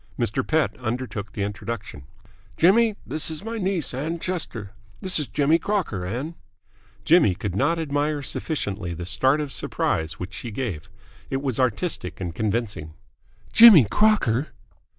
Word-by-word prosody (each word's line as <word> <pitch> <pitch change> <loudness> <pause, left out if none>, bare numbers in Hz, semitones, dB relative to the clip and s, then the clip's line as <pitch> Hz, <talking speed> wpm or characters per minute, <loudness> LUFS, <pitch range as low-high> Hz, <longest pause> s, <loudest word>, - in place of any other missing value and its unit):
Mr. - - 0
Pett - - +1
undertook 115 -4 -4
the 100 - -2
introduction. 105 - -6 0.5
"Jimmy, 215 +5 +4
this 155 - -4
is 160 +3 -6
my 225 +1 -4
niece, 185 -8 -1
Ann 155 +6 -3
Chester. 155 - -4 0.3
This 185 -3 +1
is 150 - -2
Jimmy 150 +3 +2
Crocker, 165 - -2
Ann." 130 - -4 0.7
Jimmy 155 - +5
could 95 -1 -4
not 165 +11 +2
admire 145 -1 -1
sufficiently 100 - -3
the 85 +1 -6
start 130 - +2
of 150 -2 -3
surprise 80 -9 -1
which 90 +1 -6
she 90 +7 -6
gave. 105 - -4 0.4
It 135 +1 -2
was 130 -4 -1
artistic 120 -7 -1
and 90 -3 -4
convincing. 105 -6 -2 0.6
"Jimmy 220 - +10
Crocker!" 155 - +3
130 Hz, 145 wpm, -24 LUFS, 100-165 Hz, 0.7 s, Jimmy